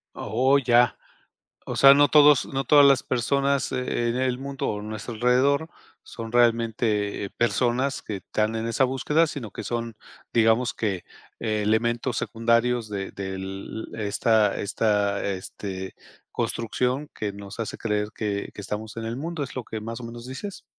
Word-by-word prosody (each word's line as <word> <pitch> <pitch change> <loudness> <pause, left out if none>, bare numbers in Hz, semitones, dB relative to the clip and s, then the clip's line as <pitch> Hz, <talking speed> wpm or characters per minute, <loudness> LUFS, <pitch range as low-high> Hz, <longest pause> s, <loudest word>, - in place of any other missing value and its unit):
Oh, 130 +6 +2
ya, 120 -1 +4 0.7
o - - -3
sea, 135 0 +8
no 145 +1 +5
todos 150 -2 +6
no 135 0 -2
todas 145 -1 +6
las 140 -2 +5
personas, 140 +2 0
e 125 -2 -1
en 115 - -1
el 130 -1 0
mundo 140 0 -4
o 105 - -3
en 105 +1 -7
nuestro 110 +2 -6
alrededor, 130 +7 +2 0.3
son 115 -1 -8
realmente, 115 -4 +1
eh, - - -7
personas 120 +5 0
que 105 - -5
están 105 +3 -2
en 115 0 -2
esa 115 +3 +2
búsqueda, 150 +5 +1
sino 130 -8 -6
que - - -7
son, 115 -2 -3 0.4
digamos 115 +2 +3
que 100 -5 -2 0.3
elementos 115 +3 0
secundarios 115 0 +1
de 100 -2 -4
del 95 +2 -6
esta 105 0 +2
esta 105 -1 0
este, 95 0 -5 0.4
construcción 125 +5 -1
que 105 -2 -3
nos 100 +2 -10
hace 115 - -4
creer 105 -2 -1
que 105 -2 -3
que 100 - -9
estamos 110 +3 -6
en 115 - -4
el 115 +2 -4
mundo, 160 +1 -3
¿es 130 - -8
lo 130 - -3
que 110 - -6
más 115 +2 -6
o - - -9
menos 120 0 -9
dices? 160 +11 -7
115 Hz, 165 wpm, -25 LUFS, 105-130 Hz, 0.7 s, sea